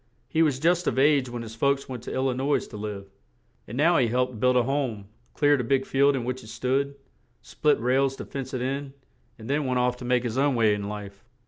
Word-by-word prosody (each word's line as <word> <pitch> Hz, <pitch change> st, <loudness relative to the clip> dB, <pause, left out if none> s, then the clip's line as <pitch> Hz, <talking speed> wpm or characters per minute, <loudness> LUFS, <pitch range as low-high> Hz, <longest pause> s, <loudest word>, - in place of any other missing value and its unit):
He 160 Hz, +5 st, +1 dB
was 145 Hz, -5 st, +2 dB
just 175 Hz, +3 st, +2 dB
of -, -, 0 dB
age 140 Hz, -2 st, +3 dB
when 120 Hz, -1 st, -5 dB
his 110 Hz, -1 st, -8 dB
folks 140 Hz, +4 st, 0 dB
went 125 Hz, -3 st, -6 dB
to -, -, -5 dB
Il 130 Hz, -, -1 dB
li 130 Hz, -, +1 dB
nois 135 Hz, +3 st, 0 dB
to -, -, -12 dB
live; 105 Hz, -2 st, -6 dB, 0.6 s
and 120 Hz, -, -7 dB
now 165 Hz, +4 st, +4 dB
he 120 Hz, -, +3 dB
helped 125 Hz, 0 st, -1 dB
build 125 Hz, +2 st, +3 dB
a 125 Hz, -, +4 dB
home, 130 Hz, -6 st, -2 dB, 0.3 s
cleared 145 Hz, -2 st, +3 dB
a -, -, -4 dB
big 135 Hz, +2 st, +1 dB
field 140 Hz, +1 st, +3 dB
in 130 Hz, -, -2 dB
which 125 Hz, +1 st, -3 dB
it -, -, -12 dB
stood, 135 Hz, +5 st, -1 dB, 0.5 s
split 150 Hz, -1 st, +1 dB
rails 130 Hz, +3 st, +1 dB
to -, -, -7 dB
fence 135 Hz, -2 st, -6 dB
it 125 Hz, -, -2 dB
in, 135 Hz, +1 st, -3 dB, 0.4 s
and 110 Hz, -, -10 dB
then 145 Hz, 0 st, 0 dB
went 125 Hz, -1 st, 0 dB
off 125 Hz, 0 st, +1 dB
to 125 Hz, -, -8 dB
make 125 Hz, 0 st, +2 dB
his 120 Hz, +1 st, -2 dB
own 140 Hz, -1 st, +2 dB
way 110 Hz, -3 st, +3 dB
in 100 Hz, 0 st, -3 dB
life. 100 Hz, -1 st, -8 dB
130 Hz, 245 wpm, -26 LUFS, 120-140 Hz, 0.6 s, now